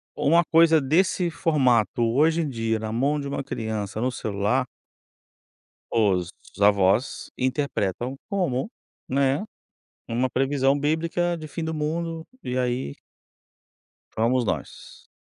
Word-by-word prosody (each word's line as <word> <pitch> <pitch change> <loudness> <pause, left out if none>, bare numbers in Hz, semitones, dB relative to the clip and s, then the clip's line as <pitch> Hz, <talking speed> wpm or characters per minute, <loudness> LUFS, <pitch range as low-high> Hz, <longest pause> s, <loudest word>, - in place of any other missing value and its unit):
ou - - -1
uma 170 +3 +5
coisa 165 -1 +6
desse 175 +5 +2
formato 135 - +2
hoje 150 +8 +3
em 155 - -2
dia 115 -3 -1
na 110 0 -4
mão 140 +6 +1
de 140 - -4
uma 140 0 -3
criança 110 -4 -4
no 130 +1 +1
celular 110 +3 0 1.3
os 95 -6 +2 0.3
avós 100 +3 +2
interpretam 130 -3 -1
como, 180 - -1 0.4
né, 135 +4 +1 0.6
uma 125 +3 0
previsão 135 +2 +1
bíblica 165 +4 0
de 155 -1 -8
fim 160 +3 -5
do 160 0 -2
mundo, 160 +2 -3 0.2
e 125 - -3
aí 125 - -1 1.2
fomos 120 +3 +1
nós. - - -5
135 Hz, 120 wpm, -25 LUFS, 115-160 Hz, 1.3 s, coisa